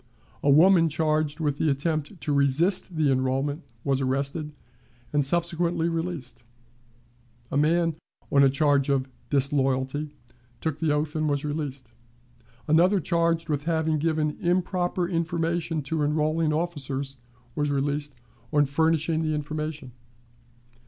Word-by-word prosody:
A 145 - +1
woman 165 +3 +6
charged 155 0 0
with 145 -3 -1
the 160 - +2
attempt 155 +5 -2
to 150 - -1
resist 155 +7 +1
the 155 -3 +2
enrollment 135 +3 0 0.2
was 135 -1 0
arrested, 140 +3 -2 0.6
and 145 -1 +3
subsequently 170 +2 +2
released. 165 -8 -4 1.1
A - - 0
man, 165 +2 +2 0.4
on 140 - +5
a 135 - +6
charge 140 0 +2
of 135 -1 +1 0.2
"disloyalty," 135 +1 0 0.5
took 160 -2 -3
the 160 -2 +1
oath, 150 +1 -1
and 155 -1 0
was 145 0 -1
released. 140 -5 -4 0.8
Another, 180 +6 +4
charged 165 0 0
with 145 -2 -2
having 160 -2 +1
given 155 -1 0
improper 180 0 0
information 165 -1 -1
to 155 +3 -2
enrolling 155 +2 +1
officers, 140 -4 -3 0.4
was 145 +1 -1
released 145 0 -1 0.4
on 145 -1 +4
furnishing 160 +2 +1
the 155 -1 0
information. 150 -2 -4
150 Hz, 125 wpm, -26 LUFS, 140-165 Hz, 1.1 s, woman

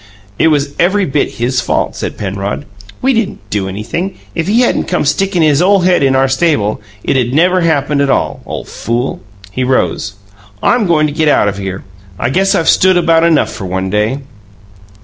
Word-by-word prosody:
"It - - +4
was 145 -2 +1
every 195 +3 +2
bit 145 -1 -1
his 125 +2 -1
fault," - - -1
said - - -5
Penrod. 100 0 -4 0.4
"We 265 +1 +3
didn't 210 - -2
do 100 -2 -1
anything. 110 - -4 0.2
If 165 0 -2
he 225 +5 +3
hadn't 245 - +1
come 175 -4 -1
stickin' 175 +4 +1
his 150 0 +3
ole 195 +1 +4
head 180 -2 +3
in 135 -1 +3
our 135 0 +3
stable, 135 -7 0 0.2
it'd 125 -1 0
never 180 +3 +3
happened 145 -3 +1
at 140 - +1
all. - - 0
Ole - - -5
fool!" 120 - -3 0.3
He 130 +7 -2
rose. 125 -5 0 0.5
"I'm 240 -5 +2
goin' 155 -3 +3
to 150 - -2
get 155 +1 +1
out 145 - +3
of 100 0 -2
here; 95 -1 -5 0.3
I 120 - -1
guess 195 +5 +2
I've 165 -4 0
stood 185 -1 +4
about 165 -1 +3
enough 170 -2 +2
for 100 - -7
one 95 +1 -2
day." 105 +5 0
145 Hz, 190 wpm, -13 LUFS, 120-175 Hz, 0.5 s, It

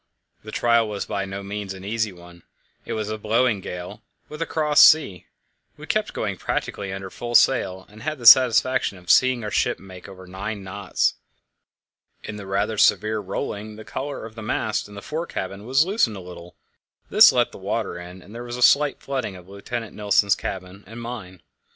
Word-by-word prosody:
The 110 - -9
trial 115 -1 +2
was 105 -1 -4
by 100 -2 -3
no 100 +1 -6
means 100 -1 -5
an 95 0 -10
easy 110 0 -1
one. 85 -1 -15 0.4
It - - -4
was 110 -1 -3
blowing 110 +1 +1
a - - -12
gale, 90 0 -7 0.3
with 150 +1 -8
a 165 - -1
cross 150 -2 +3
sea; 125 - +5 0.5
we - - -10
kept - - -1
going - - -3
practically 100 -1 -3
under 95 -1 -6
full 120 0 -5
sail, 95 -9 +3
and 105 +1 -15
had 155 +5 -3
the 120 - -10
satisfaction 130 -3 +6
of 90 -1 -1
seeing 130 -2 +4
our 105 - -4
ship - - +1
make 95 -1 -12
over 95 -1 -12
nine 100 +3 -6
knots. 95 +1 -1 1.1
In 105 - -6
the 100 -2 -9
rather 100 +2 -1
severe 110 0 +3
rolling 105 +2 -5
the 110 0 -11
collar 140 -3 -5
of 115 - -10
the 110 - -9
mast 110 0 -2
in 105 - -13
the 100 - -9
fore 165 +3 -4
cabin 100 +3 -6
was 135 +5 +4
loosened 185 - +1
a - - -7
little; 90 -1 -11 0.6
this - - +8
let - - +1
the - - -11
water 90 - -3
in, 90 +1 -11
and 100 - -15
there 120 +1 -7
was 120 0 -6
a 125 - 0
slight 145 +3 +4
flooding 130 -8 -4
of 90 -1 -13
Lieutenant 105 +3 -6
Nilsen's 100 -1 +3
cabin 95 +1 -6
and 115 +3 -9
mine. 105 -7 -8
105 Hz, 200 wpm, -23 LUFS, 95-120 Hz, 1.1 s, this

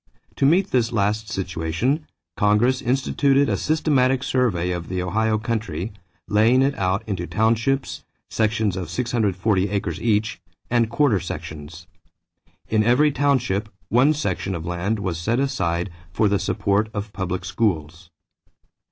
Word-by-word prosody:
To 135 - +3
meet 180 +6 +3
this 120 -2 +2
last 105 0 0
situation, 95 - -2 0.3
Congress 105 +5 +2
instituted 135 +2 +2
a - - +1
systematic 135 -4 +1
survey 100 -11 0
of 85 -1 -4
the 95 0 -2
Ohio 110 +5 +1
country, 105 -5 -3 0.3
laying 115 +5 +4
it 140 +1 +2
out 95 +3 0
into 90 -5 -3
townships, 115 +5 0 0.2
sections 110 -3 0
of 90 -4 -5
640 105 -3 0
acres 100 0 -3
each, 110 -1 0 0.3
and 120 -2 +2
quarter 120 -4 +2
sections. 80 +1 -7 0.8
In 110 -1 +2
every 130 +7 +4
township 125 -7 0 0.2
one 130 +7 +4
section 95 -8 -2
of 85 -1 -6
land 90 +5 -1
was 95 -5 -3
set 115 +8 0
aside 90 -10 -1 0.2
for 105 +5 +2
the 100 -1 +1
support 100 +1 0
of 105 0 -4
public 95 0 -3
schools. 85 -4 -2
110 Hz, 135 wpm, -22 LUFS, 95-125 Hz, 0.8 s, laying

